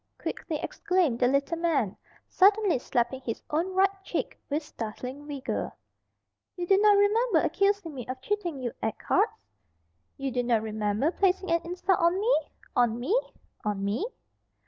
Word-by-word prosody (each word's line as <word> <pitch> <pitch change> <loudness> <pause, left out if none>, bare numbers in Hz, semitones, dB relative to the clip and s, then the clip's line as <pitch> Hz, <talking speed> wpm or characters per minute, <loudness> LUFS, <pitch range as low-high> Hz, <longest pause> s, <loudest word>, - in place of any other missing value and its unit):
quickly 315 - -3
exclaimed 345 -10 +1
the 245 - +4
little 280 +5 +1
man, 280 - +1 0.3
suddenly 400 - +4
slapping 245 +1 -1
his 235 -3 -5
own 335 +5 0
right 390 0 +2
cheek - - -3
with 295 +2 -1
startling 255 +3 -7
vigour. 285 -2 -3 0.8
"You 355 - -3
do 390 - +5
not 415 -1 +6
remember 420 0 +3
accusing 395 -2 +1
me 250 -4 -7
of 255 0 -5
cheating 355 0 -2
you 250 -3 -3
at 220 - -1
cards?" - - +2 0.9
"You 270 -1 -2
do 250 0 0
not 235 -3 +1
remember 215 +6 0
placing 380 -1 +1
an 335 0 +3
insult 360 +2 0
on 340 +2 +3
me! 460 +5 +3 0.4
on 240 -2 +3
me! 265 - -1 0.5
on 205 -2 -1
me?" 205 - 0
300 Hz, 155 wpm, -28 LUFS, 245-380 Hz, 0.9 s, not